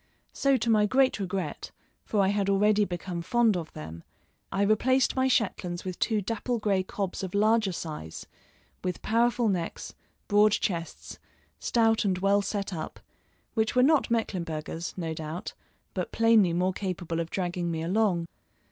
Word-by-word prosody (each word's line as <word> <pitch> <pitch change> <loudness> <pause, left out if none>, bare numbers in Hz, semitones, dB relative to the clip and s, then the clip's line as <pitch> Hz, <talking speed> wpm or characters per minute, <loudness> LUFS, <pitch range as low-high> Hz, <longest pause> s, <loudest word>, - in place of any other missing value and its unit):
So 275 -1 +2
to 235 - -1
my 210 -1 +4
great 260 0 +3
regret, 185 -5 -3 0.4
for 210 - +1
I 190 - +3
had 200 -1 0
already 205 +1 +3
become 175 -1 -4
fond 230 +4 +2
of 165 -3 -4
them, 80 +2 -8 0.5
I 195 - +1
replaced 245 +6 +3
my 260 0 +2
Shetlands 185 -8 0
with 185 -1 -5
two 215 -3 +1
dapple 230 +4 -2
gray 205 -3 +1
cobs 190 0 -4
of 190 0 -5
larger 215 0 +3
size, 150 - -6 0.6
with 180 -1 -3
powerful 235 +1 +2
necks, 180 -5 -3 0.3
broad 210 0 +5
chests, 170 -6 -3 0.4
stout 225 -2 +2
and 190 -3 +1
well 200 +2 +3
set 200 -1 -3
up, 155 -2 -6 0.5
which 220 0 0
were 250 - +5
not 295 0 +4
Mecklenburghers, 170 -8 -3
no 165 -3 -3
doubt, 160 +2 -6 0.4
but - - -3
plainly 225 -5 +4
more 180 +2 +1
capable 175 -4 -3
of 165 0 -3
dragging 175 -1 -2
me 160 -1 -2
along. 185 -1 +1
195 Hz, 155 wpm, -28 LUFS, 175-220 Hz, 0.6 s, broad